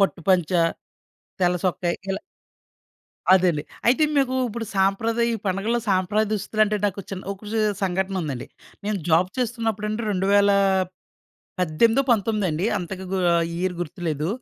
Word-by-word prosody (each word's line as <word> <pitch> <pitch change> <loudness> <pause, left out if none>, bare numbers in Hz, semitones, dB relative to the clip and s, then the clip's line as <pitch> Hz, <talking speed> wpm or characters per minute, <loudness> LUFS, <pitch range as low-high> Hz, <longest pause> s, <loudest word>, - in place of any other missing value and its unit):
పట్టు 195 -2 +1
పంచా, 175 -2 +3 0.8
తెల్లసొక్కయి 180 -1 +1
ఇలా. 195 - -2 1.1
అదండి. 175 -5 +2 0.2
అయితే 260 +6 +4
మీకు 265 -2 +2
ఇప్పుడు 225 +1 -5
సాంప్రదాయ 225 +5 +2
ఈ - - -1
పండుగల్లో 205 +6 0
సాంప్రదాయ 195 +3 +2
దుస్తులంటే 215 0 +1
నాకు 200 0 -3
చిన్న 190 -1 -6
ఒక 200 +2 -11
సే 225 - +1 0.2
సంఘటనుందండి. 185 -8 -2 0.4
నేను 210 -1 -1
జాబ్ 170 +3 +4
చేస్తున్నప్పుడండి 225 -3 -1
రెండువేల 200 +1 +3 1.1
పద్దెనిమిదో 225 - +3
పంతొమ్మిదో 215 -2 +2
అండి 160 +6 -1
అంతగా 190 +1 -6
గూ 190 - +1 0.2
ఆ - - +4 0.2
ఇయర్ 185 0 -1
గుర్తులేదు. 160 -2 -3
195 Hz, 125 wpm, -23 LUFS, 180-215 Hz, 1.1 s, అయితే